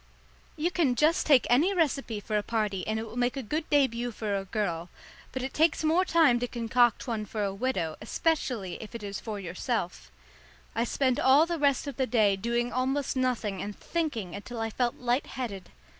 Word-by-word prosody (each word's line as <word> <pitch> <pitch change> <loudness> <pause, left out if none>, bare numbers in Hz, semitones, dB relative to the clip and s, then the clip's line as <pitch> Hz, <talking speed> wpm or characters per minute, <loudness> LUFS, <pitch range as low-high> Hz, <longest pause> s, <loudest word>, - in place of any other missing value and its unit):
You 330 +3 0
can 300 -9 +2
just 310 +5 +2
take 280 -5 +6
any 320 +11 +3
recipe 275 - 0
for 210 +1 -4
a 210 - +3
party 205 -4 -2
and 220 0 0
it 220 - -2
will 225 - -10
make 245 +2 +1
a 270 - -3
good 305 +8 -3
début 245 -4 +2
for 210 -2 -2
a 195 0 -2
girl, 180 -4 -2 0.4
but 260 - -4
it 265 - -4
takes 320 +1 +2
more 325 +4 +3
time 315 -9 +4
to 245 - -1
concoct 240 0 +2
one 225 -4 -2
for 210 +1 -3
a 195 -1 -1
widow, 195 -8 -2
especially 230 - -1
if 220 +1 -9
it 230 - -6
is 200 -1 -4
for 215 -3 -5
yourself. 180 - -3 0.6
I 230 +2 0
spent 260 +1 +1
all 275 +4 +6
the 340 -1 -3
rest 280 -2 +2
of 280 -4 -6
the 260 - +1
day 215 -5 +3
doing 235 +4 -1
almost 265 +3 0
nothing 235 -7 -1
and 205 0 -6
thinking 260 - -2
until 230 +4 -7
I 225 0 -2
felt 240 +1 0
light 245 +2 0
headed. 210 -8 -5
240 Hz, 205 wpm, -28 LUFS, 210-275 Hz, 0.6 s, take